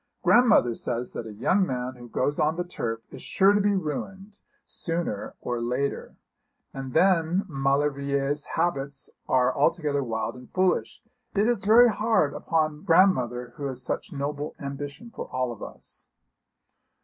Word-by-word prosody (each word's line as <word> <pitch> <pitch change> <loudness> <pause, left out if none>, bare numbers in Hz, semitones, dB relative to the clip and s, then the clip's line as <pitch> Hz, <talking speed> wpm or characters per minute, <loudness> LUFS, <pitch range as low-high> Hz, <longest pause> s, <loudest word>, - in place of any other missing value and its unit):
Grandmother 235 - +5
says 120 +1 -3
that 115 - -6
a - - -7
young 185 - +2
man 125 -5 -2
who 120 -1 -12
goes 145 +5 -1
on 155 +1 +2
the 175 - -1
turf 115 -10 -4
is - - -10
sure 195 +1 +4
to 205 - +3
be 205 0 +2
ruined 195 +5 -5 0.3
sooner 165 - -3
or 120 -1 -3
later. 125 +4 -2 0.6
And 135 -1 -6
then 180 +2 +3
Maulevrier's 140 0 0
habits 145 -5 -2 0.2
are 125 0 +3
altogether 150 -2 +1
wild 110 -2 -2
and 125 -1 -13
foolish. 185 0 0 0.3
It 205 +2 +3
is 235 -5 0
very 235 +3 +7
hard 215 -8 +1
upon 155 -2 -1
grandmother, 125 - +3
who 145 - -4
has 130 -2 -4
such - - -3
noble 145 +1 -4
ambition 145 +10 -7
for - - -7
all 130 -1 -1
of 115 - -10
us.' - - -9
145 Hz, 150 wpm, -26 LUFS, 130-185 Hz, 0.6 s, very